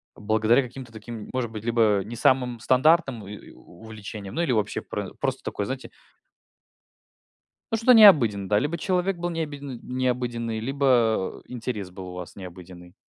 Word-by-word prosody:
благодаря 110 +4 +2
каким-то 125 -1 -10
таким, 110 0 -8
может 125 -3 -2
быть, 110 -1 -7
либо 115 -4 +2
не 110 +5 -8
самым 125 0 +2
стандартным 130 - +2
и 100 - -8
и - - -13
у 90 - -18
увлечениям 110 +2 -8
или 170 -6 +1
вообще 110 -4 0
про - - -5
просто - - -3
такое, 100 - -3
знаете 130 +4 -6 1.8
Ну, - - +3
что-то 230 +3 +5
необыденное, 120 - +6
да. 105 - +3
Либо 150 +8 -1
человек 185 +2 0
был 175 0 -3
необиден 145 -6 -5
необыденный, 120 -3 -2
либо 120 -5 +1
интерес 115 -6 -5
был 90 0 -9
у - - -8
вас 90 -1 -8
необыденный. 90 -1 -11
120 Hz, 155 wpm, -25 LUFS, 105-135 Hz, 1.8 s, необыденное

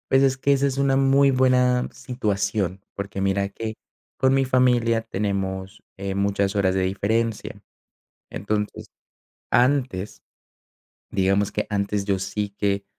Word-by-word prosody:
Pues 135 +1 +5
es 135 -1 +3
que 140 +2 +1
esa 140 0 +3
es 135 -1 -3
una 135 -1 +2
muy 135 +1 +4
buena 125 -1 +3
situación, 100 -6 -2
porque 100 -1 -5
mira 100 0 +1
que 110 +2 -6 0.4
con 130 0 +3
mi 135 0 +3
familia 125 -3 +2
tenemos, 95 -2 -3
eh, 100 -1 -4
muchas 100 0 0
horas 95 -2 +2
de 95 - +1
diferencia. 105 +4 -1 0.7
Entonces 105 +1 -3 0.6
antes, 125 -6 +1 0.9
digamos 100 +1 +1
que 105 - -2
antes 100 0 -1
yo 100 -2 0
sí 100 +2 -3
que 100 -1 -1
105 Hz, 135 wpm, -23 LUFS, 100-125 Hz, 0.9 s, Pues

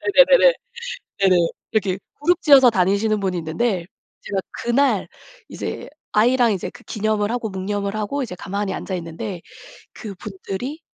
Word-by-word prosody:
네네네네. - - +6 0.7
네네. 190 -2 +5 0.4
이렇게 195 -3 0 0.2
그룹 350 +3 +2
지어서 275 -4 +7
다니시는 205 +1 +2
분이 190 -2 -1
있는데 170 +3 -1 0.4
제가 195 - -2
그날 260 +4 +1 0.4
이제 - - -5 0.2
아이랑 235 +1 +4
이제 185 - -3
그 - - -15
기념을 215 0 0
하고 235 -3 -2
묵념을 200 +1 -3
하고 215 +7 -2
이제 200 -7 -6
가만히 200 +1 -3
앉아 190 - -4
있는데 170 +1 -6 0.5
그분들이 210 - -6
210 Hz, 325 characters per minute, -21 LUFS, 190-245 Hz, 0.7 s, 지어서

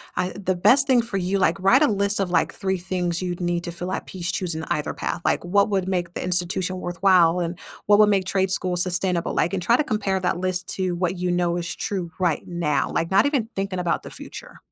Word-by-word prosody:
I 180 - 0
the 190 -1 -2
best 265 +10 +4
thing 255 -3 +4
for 230 -4 -3
you, 190 +1 0
like, 195 0 +1
write 230 +10 +5
a - - +5
list 200 0 0
of, 190 -3 -1
like, - - +1
3 190 -1 -2
things 180 -1 -2
you'd 180 -1 -3
need 175 0 -1
to 170 - -4
fill 175 +2 -5
at - - -4
peace 180 -1 -4
choosing 170 -3 -2
either 150 - -1
path, 170 - -4
like, - - +1
what 200 +4 +2
would 190 -2 0
make 175 -2 -2
the - - -4
institution 180 +1 0
worthwhile 175 -1 +3
and 170 0 -3 0.3
what 205 0 +5
would 210 -1 +6
make 195 -2 +2
trade 190 0 0
school 185 -1 0
sustainable, 180 0 0
like, 175 - +1
and 190 - -1
try 230 +8 +3
to 305 - +1
compare 200 -6 -1
that 180 -1 -1
list 185 0 -2
to 185 -2 -1
what 180 +1 -1
you 180 0 -2
know 175 -1 0
is 170 -1 -4
true 185 -4 -3
right 175 -5 +1
now, 160 -5 -1
like, 165 +2 -1
not 195 +3 +4
even 265 -7 -1
thinking 195 -1 -3
about 175 -1 -1
the - - -9
future. - - -9
185 Hz, 240 wpm, -23 LUFS, 175-195 Hz, 0.3 s, would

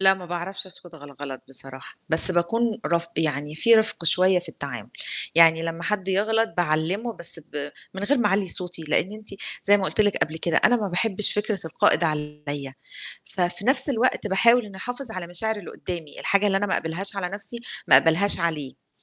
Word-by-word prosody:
لأ 190 0 +5
ما 185 -2 -11
باعرفش 175 +3 -5
أسكُت 175 -2 -12
غَل 145 -2 -13
الغلط 135 -1 -9
بصراحة، 135 0 -7
بس 160 +3 +6
باكون 220 +6 -1
رف 170 0 -1
يعني 150 -1 -2
في 230 +7 +4
رِفْق 220 -6 +1
شوية 185 +2 +4
في 175 -1 -8
التعامل. 140 -5 -8 0.4
يعني 165 -1 +5
لمّا 165 +1 -5
حد 195 0 -2
يغلط 220 +4 0
باعلِّمه، 175 +7 -1
بس 170 -4 +1
ب 145 -2 -6 0.3
من 190 - -6
غير 280 +5 +1
ما 225 - +1
أعلّي 195 -1 0
صوتي، 175 -3 -1
لإن 160 +5 -1
أنتِ 215 0 -8 0.3
زي 205 +1 +5
ما 195 - -3
قُلت 200 - -1
لِك 205 -2 +2
قبل 155 +1 -9
كده، 170 0 -1
أنا 245 - +5
ما 210 -4 -3
باحبّش 195 +2 +4
فكرة 210 0 -1
القائد 160 +1 +2
عليّا. 150 -3 -3 0.6
ففي 180 +2 -1
نَفْس 265 +3 +6
الوقت 250 -2 +1
باحاول 230 +5 +3
إنّي 200 -2 -12
أحافظ 245 +4 -5
على 185 -4 -6
مشاعر 215 +6 -1
اللي 200 -5 -9
قُدّامي، 170 -4 -8
الحاجة 200 +1 +2
اللي 195 -1 +1
أنا 200 +1 0
ما 190 - 0
أقبلهاش 185 +5 0
على 190 -2 -2
نَفْسي 205 +5 -3 0.3
ما - - +8
أقبلهاش 175 +4 +4
عليه. 155 -6 -4
185 Hz, 195 wpm, -23 LUFS, 160-210 Hz, 0.6 s, ما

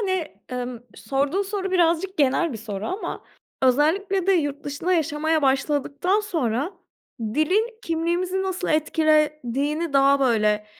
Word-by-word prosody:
hani, 375 -5 -1 0.2
emm, 250 -1 -4 0.2
sorduğun 275 - -1
soru 390 -1 -3
birazcık 355 +1 +1
genel 290 +3 +2
bir 225 - -6
soru 205 -2 -5
ama 380 +4 -4 0.4
özellikle 340 +9 +2
de 390 - +5
yurt 290 -5 -1
dışında 290 +6 -2
yaşamaya 315 -1 0
başladıktan 285 +7 +1
sonra 315 - -1 0.5
dilin 365 - 0
kimliğimizi 345 +3 -1
nasıl 375 -1 -3
etkilediğini 305 -1 +1
daha 275 0 +4
böyle 215 -4 +2
310 Hz, 120 wpm, -23 LUFS, 270-365 Hz, 0.5 s, de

